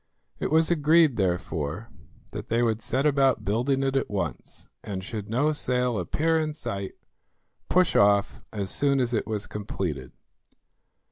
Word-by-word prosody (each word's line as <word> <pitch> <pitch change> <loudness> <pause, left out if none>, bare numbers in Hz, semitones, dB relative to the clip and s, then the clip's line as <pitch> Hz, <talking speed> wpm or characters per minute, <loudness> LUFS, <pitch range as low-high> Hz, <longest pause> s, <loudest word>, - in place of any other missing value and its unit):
It - - -1
was 160 +2 +3
agreed 155 -2 +4
therefore 90 0 -2 0.4
that - - -7
they 115 +1 +1
would 115 -1 0
set 130 +6 -1
about 135 -3 +2
building 125 +6 +1
it 135 0 0
at 135 - 0
once, 85 -10 -4 0.2
and 95 -2 -5
should 105 0 -6
no 140 +7 +2
sail 125 -5 0
appear 160 - +1
in 155 -1 -2
sight, 100 -10 -5 0.8
push 185 0 +3
off 100 0 +3
as 100 -3 -3
soon 140 -1 +2
as 125 -1 0
it 110 - -1
was 105 -2 -3
completed. 95 -9 -5
115 Hz, 150 wpm, -26 LUFS, 100-140 Hz, 0.8 s, agreed